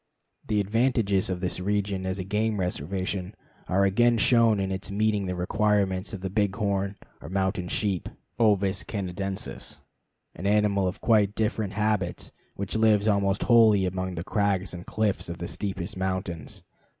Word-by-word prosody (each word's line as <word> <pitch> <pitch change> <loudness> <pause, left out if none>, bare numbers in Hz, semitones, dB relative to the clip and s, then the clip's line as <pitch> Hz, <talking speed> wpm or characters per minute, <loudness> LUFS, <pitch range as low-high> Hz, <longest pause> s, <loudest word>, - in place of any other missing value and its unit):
The 105 -1 +1
advantages 105 -2 +1
of 90 -1 -3
this 90 -1 -2
region 100 -1 -1
as 95 +1 -2
a 95 - -3
game 105 +2 0
reservation 95 +3 -3 0.3
are 100 +2 +3
again 120 +5 +3
shown 115 -2 +4
in 95 0 -1
its 95 +2 -4
meeting 105 -1 0
the 90 - -2
requirements 95 +1 +1
of 100 - -6
the 95 - -3
bighorn, 100 -1 0 0.3
or 75 - -8
mountain 95 -1 -1
sheep 95 -1 -1 0.3
(Ovis 100 -4 +2
canadensis), 95 -1 -5 0.6
an 95 - -4
animal 100 -2 +2
of 90 - -4
quite 105 -3 +3
different 105 -2 -1
habits, 105 -4 -1 0.2
which 100 +1 -4
lives 110 -1 +3
almost 100 -1 +2
wholly 110 -5 +5
among 95 0 -3
the 85 - -4
crags 95 -3 0
and 90 0 -8
cliffs 105 -4 -1
of 85 - -5
the 85 - -5
steepest 95 0 -4
mountains. 95 -5 -4
100 Hz, 155 wpm, -26 LUFS, 95-105 Hz, 0.6 s, wholly